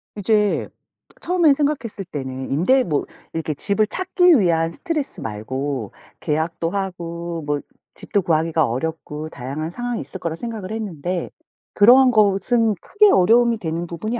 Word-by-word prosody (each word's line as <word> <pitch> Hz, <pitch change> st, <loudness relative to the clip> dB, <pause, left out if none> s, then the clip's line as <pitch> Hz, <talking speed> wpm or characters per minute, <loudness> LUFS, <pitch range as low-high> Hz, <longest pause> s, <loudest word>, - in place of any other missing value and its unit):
이제 210 Hz, 0 st, +1 dB, 0.5 s
처음에 340 Hz, -4 st, +4 dB
생각했을 270 Hz, -9 st, -2 dB
때는 130 Hz, -5 st, -6 dB
임대 250 Hz, -, +3 dB
뭐 150 Hz, -7 st, -1 dB, 0.3 s
이렇게 160 Hz, -1 st, -2 dB
집을 205 Hz, +7 st, 0 dB
찾기 360 Hz, -, +3 dB
위한 165 Hz, -3 st, +2 dB
스트레스 310 Hz, -, -4 dB
말고 120 Hz, +2 st, -4 dB, 0.3 s
계약도 165 Hz, +2 st, -1 dB
하고 170 Hz, -4 st, -4 dB
뭐 145 Hz, -1 st, -1 dB, 0.3 s
집도 200 Hz, -, -1 dB
구하기가 160 Hz, -2 st, +1 dB
어렵고 155 Hz, +4 st, -4 dB
다양한 145 Hz, +6 st, -5 dB
상황이 245 Hz, +2 st, -3 dB
있을 190 Hz, -, -9 dB
거라 165 Hz, -2 st, -3 dB
생각을 220 Hz, -1 st, -6 dB
했는데 180 Hz, -5 st, -3 dB, 0.4 s
그러한 250 Hz, +5 st, +7 dB
것은 215 Hz, +1 st, +3 dB
크게 415 Hz, 0 st, +4 dB
어려움이 230 Hz, +5 st, +4 dB
되는 170 Hz, -3 st, -3 dB
부분이 215 Hz, +8 st, -4 dB
180 Hz, 320 characters per minute, -21 LUFS, 160-230 Hz, 0.5 s, 그러한